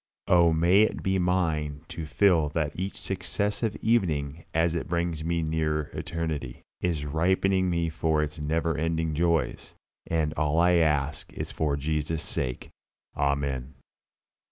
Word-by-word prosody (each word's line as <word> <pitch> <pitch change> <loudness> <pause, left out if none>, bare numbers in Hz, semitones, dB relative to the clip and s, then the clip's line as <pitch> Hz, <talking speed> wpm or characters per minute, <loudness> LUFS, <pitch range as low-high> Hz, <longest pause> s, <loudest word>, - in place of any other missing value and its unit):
Oh, 85 -2 +5
may 85 +5 +4
it 110 - +1
be 95 0 +1
mine 80 -5 0
to 80 -2 -6
feel 85 -4 +3
that 75 -2 0
each 95 +2 -4
successive 100 +4 -1
evening 80 -9 0
as 80 +1 +2
it 85 - -3
brings 85 -2 -1
me 85 0 0
nearer 80 -1 -1
eternity, 80 -6 -4 0.2
is 80 -5 -1
ripening 95 +5 +2
me 85 -1 0
for 80 -1 +1
its 75 +1 -5
never 80 +2 0
ending 80 0 -1
joys. 85 +1 0 0.3
And 80 -2 0
all 80 0 0
I 90 +1 +5
ask 75 -3 0
is - - -5
for 75 -3 0
Jesus' 75 +2 -1
sake. 60 -1 -2 0.5
Amen. 70 -2 -1
80 Hz, 140 wpm, -27 LUFS, 75-85 Hz, 0.5 s, Oh